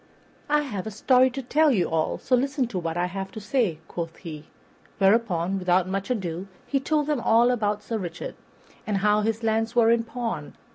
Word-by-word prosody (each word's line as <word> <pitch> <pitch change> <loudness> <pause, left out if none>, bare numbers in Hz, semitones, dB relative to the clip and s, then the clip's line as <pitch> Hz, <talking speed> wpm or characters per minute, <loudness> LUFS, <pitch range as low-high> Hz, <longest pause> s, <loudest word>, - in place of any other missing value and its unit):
"I 300 0 +3
have 215 -8 -5
a - - -2
story 255 +4 +4
to 265 +2 -6
tell 305 +5 +3
you 195 - +2
all, 160 -1 0
so 255 - +1
listen 270 +1 0
to 190 - -3
what 165 -1 -3
I 175 - +1
have 190 +1 -5
to 220 - -6
say," 210 - 0
quoth 165 -1 -5
he; 155 -4 -9 0.5
whereupon, 195 -3 +2
without 180 0 +2
more 195 +1 -1
ado, 190 -6 -3 0.2
he 275 - 0
told 300 +2 0
them 295 -2 0
all 235 +2 +4
about 210 -3 -1
Sir 225 0 -3
Richard, 170 -3 -5 0.5
and 210 -2 0
how 210 0 +4
his 225 +1 -1
lands 225 +1 0
were 230 -1 +5
in 230 0 +3
pawn. 235 0 -5
215 Hz, 200 wpm, -25 LUFS, 185-245 Hz, 0.5 s, were